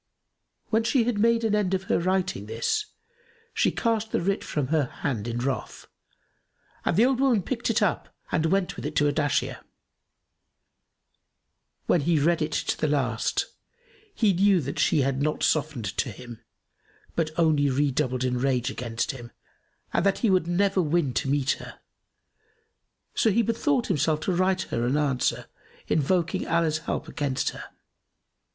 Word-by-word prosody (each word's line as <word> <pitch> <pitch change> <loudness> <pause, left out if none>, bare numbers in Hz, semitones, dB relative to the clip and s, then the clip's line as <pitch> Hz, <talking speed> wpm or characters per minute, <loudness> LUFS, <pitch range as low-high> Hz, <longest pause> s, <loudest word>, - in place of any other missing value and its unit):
When 225 0 +3
she 235 +1 +2
had 225 -3 -1
made 230 +1 +3
an 220 -2 +1
end 200 -3 +1
of 190 - -3
her - - +1
writing 185 - -1
this, 115 - -1 0.7
she - - +2
cast 225 -2 -1
the - - +1
writ 195 +3 -1
from 145 -4 -2
her 155 -2 +2
hand 120 -3 -4
in 120 0 -3
wrath, 130 +2 -3 1.0
and - - 0
the 225 - +6
old 260 -1 +1
woman 255 -8 +3
picked 240 +2 -2
it 230 -1 +2
up 190 - 0 0.2
and 160 - +1
went 190 +2 0
with - - -8
it 155 - -7
to 145 - +3
Ardashir. 145 -1 0 2.3
When 175 - +3
he 165 +2 +2
read 165 +3 +2
it 155 +1 -1
to - - -1
the 155 - +1
last 130 -6 0 0.7
he 210 -4 +3
knew 195 +1 +4
that 140 0 -5
she 155 - +3
had 135 0 0
not 150 +1 -1
softened 140 -10 0
to - - 0
him, 120 0 -10 0.7
but 165 -2 0
only 155 -4 +3
redoubled 130 -1 0
in 125 -1 0
rage 130 -1 0
against 115 -3 -3
him 120 -3 -10 0.6
and - - +2
that 195 0 +2
he 210 - +4
would 185 -3 +2
never 190 +2 +2
win 155 -4 +1
to 135 - -1
meet 140 -1 +2
her, - - -11 1.3
so 225 - +2
he 230 +3 +3
bethought 240 +3 +1
himself 155 - +1
to 185 - 0
write 185 +1 +1
her 115 - -3
an 125 +4 +1
answer 140 -4 0 0.4
invoking 175 +5 0
Allah's 165 -2 +1
help 165 - -4
against 140 -3 -1
her. - - -9
160 Hz, 165 wpm, -26 LUFS, 135-195 Hz, 2.3 s, the